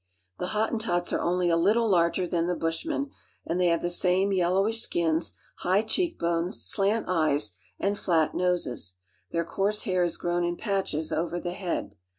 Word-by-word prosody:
The 180 - -2
Hottentots 220 -5 0
are - - +1
only 175 0 +1
a - - +4
little 210 +7 +3
larger 180 -1 +3
than 170 -1 0
the 180 - 0
Bush 165 - -2
K^en; 280 -3 -2 0.3
and 175 +2 -1
they 180 - +4
have 170 -1 +2
the 175 - +1
same 185 +3 +2
yellowish 195 +5 +2
skins, 165 -5 0 0.2
high 190 +4 +2
cheek 340 +10 0
lones, 170 +3 0
slant 210 +2 0
eyes, 155 - +1 0.3
and 200 +1 0
flat 160 -3 +2
noses. 150 - -1 0.3
Their 170 0 -1
coarse 205 +4 0
hair 185 -6 +1
is 175 - -1
frown 175 0 0
in 175 0 -1
patches 190 -7 -2
over 170 +2 -1
the 175 0 -4
head. 180 -2 -3
180 Hz, 175 wpm, -27 LUFS, 170-200 Hz, 0.3 s, a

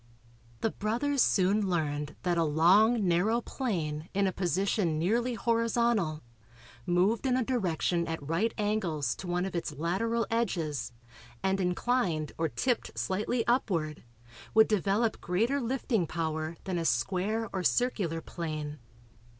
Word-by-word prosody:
The 225 - +1
brothers 245 +6 0
soon 195 0 +3
learned 150 -4 -1
that 175 -1 +1
a 165 - +2
long 190 +8 +4
narrow 190 +7 +2
plane 165 - -3
in 200 0 +3
a 190 - +1
position 185 -1 0
nearly 235 +9 +1
horizontal, 230 -7 +1 0.6
moved 195 +8 +2
in 255 -1 +2
a 255 - 0
direction 180 -7 0
at 165 -4 -5
right 180 +9 +1
angles 185 - 0
to 185 - -7
one 175 +1 0
of 190 - -5
its 170 - -2
lateral 195 +10 -1
edges 160 - -1 0.5
and 190 0 +1
inclined 180 - 0
or 165 -1 +1
"tipped" 250 - -1
slightly 215 +5 -1
upward 170 - 0 0.5
would 220 0 +7
develop 210 +2 +1
greater 230 +11 +1
lifting 235 -6 0
power 160 0 -3
than 185 -3 -2
a 165 - -2
square 195 - 0
or 190 - -1
circular 185 -7 0
plane. 155 -3 -5
190 Hz, 135 wpm, -30 LUFS, 165-225 Hz, 0.6 s, would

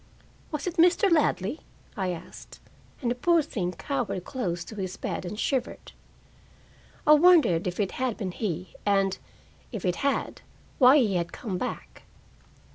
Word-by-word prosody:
"Was 300 -2 -3
it 360 -1 -4
Mr. 355 +3 +4
Ladley?" 290 - +1 0.4
I 190 -4 -1
asked, 175 -2 -9 0.4
and 240 - +1
the - - +2
poor 330 +6 +3
thing 180 -11 -3
cowered 245 -10 -3
close 175 -10 -3
to 215 - -10
his 190 -2 -5
bed - - -4
and 210 +4 -6
shivered. 260 -2 -2 1.1
I 300 - +5
wondered 300 - +5
if 180 +2 -4
it 195 -3 0
had 255 -3 -2
been 190 -4 -3
he, 180 -3 -4
and, 195 -1 +1 0.5
if 220 -7 -5
it 180 -1 0
had, 280 0 -1 0.4
why 260 +2 +8
he 210 -9 +2
had 170 -1 -2
come 190 -6 -5
back. - - -6
215 Hz, 155 wpm, -27 LUFS, 185-285 Hz, 1.1 s, why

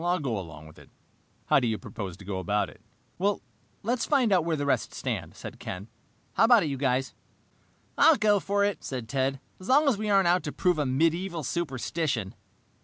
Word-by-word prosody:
"I'll 175 +1 +2
go 135 -8 -2
along 80 -4 -9
with 80 - -15
that. - - -16 0.6
How - - +4
do 125 - 0
you 110 -1 0
propose 100 -6 -7
to 100 - -13
go 95 -1 -3
about 105 +2 0
it?" - - -20 1.0
"Let's 235 +2 0
find 260 -7 +2
out 180 - +4
where 165 -1 0
the 145 -1 -2
rest 140 - 0
stand," - - -4
said - - -9
Ken. 95 +5 -7 0.4
"How - - +4
about 235 -3 +6
it, 155 - -1
you 135 - -3
guys?" 130 0 0 0.9
"I'll 325 - +7
go 210 -1 +3
for 200 +2 +1
it," 205 -3 -2
said 125 -4 -5
Ted, 135 +1 -1 0.2
"as 185 - -10
long 290 +3 +5
as 240 -7 +2
we 215 0 -2
aren't 195 -3 +4
out 180 +1 +4
to - - -3
prove 180 -4 +1
a 145 - +1
medieval 165 +5 0
superstition." 135 - -2
155 Hz, 205 wpm, -27 LUFS, 125-200 Hz, 1.0 s, I'll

